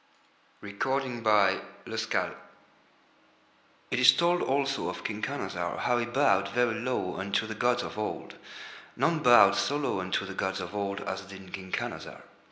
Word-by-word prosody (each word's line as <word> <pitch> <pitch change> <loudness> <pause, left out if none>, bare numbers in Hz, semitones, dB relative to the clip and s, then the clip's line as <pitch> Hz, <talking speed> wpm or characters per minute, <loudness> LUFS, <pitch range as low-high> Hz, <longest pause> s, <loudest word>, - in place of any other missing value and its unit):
THE 100 0 -8
SORROW 115 -7 +2 0.2
OF - - -4
SEARCH - - -1 1.6
It 130 - +1
is 125 - +8
told 175 +1 +2
also 140 0 0
of - - -7
King 105 0 -4
Khanazar 95 -10 -3
how 120 0 +1
he 120 - -1
bowed 120 -7 +2
very 120 +1 +1
low 125 -6 -2
unto 100 +3 -1
the 110 - -5
gods 120 +3 +1
of - - -6
Old. 105 - -4 0.6
None 165 -1 +1
bowed 120 -8 +7
so 140 +7 0
low 140 -9 -1
unto 95 +1 -1
the 95 - -7
gods 95 0 -2
of 90 +1 -6
Old 100 -1 -3
as 95 +1 -4
did 95 -1 -12
King 95 -1 -7
Khanazar. - - -5
110 Hz, 165 wpm, -29 LUFS, 95-130 Hz, 1.6 s, is